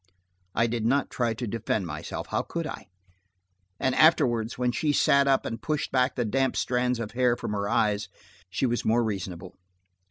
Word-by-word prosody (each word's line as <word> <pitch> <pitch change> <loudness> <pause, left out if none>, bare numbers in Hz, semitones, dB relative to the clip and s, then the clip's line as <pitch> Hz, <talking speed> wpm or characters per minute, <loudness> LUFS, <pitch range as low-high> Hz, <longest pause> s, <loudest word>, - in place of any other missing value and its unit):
I 115 - +3
did 115 -1 -2
not 135 +5 +1
try 120 -2 0
to 120 - -4
defend 110 -2 -2
myself. 75 -2 -5
How - - +1
could 170 -1 -4
I? 155 - -7 0.9
And 130 -1 +1
afterward 125 -8 +4
when 125 0 0
she 145 +5 0
sat 140 -1 +4
up 135 -1 +3
and 115 0 -4
pushed 155 -2 -2
back 130 0 +2
the 120 - 0
damp 130 +4 +1
strands 125 -1 0
of 115 -2 -4
hair 125 0 +2
from - - -4
her 100 -1 -2
eyes, 105 -2 +1 0.4
she 95 - -1
was 120 -1 0
more 115 +2 +2
reasonable. 95 -4 -4
120 Hz, 185 wpm, -27 LUFS, 110-130 Hz, 0.9 s, afterward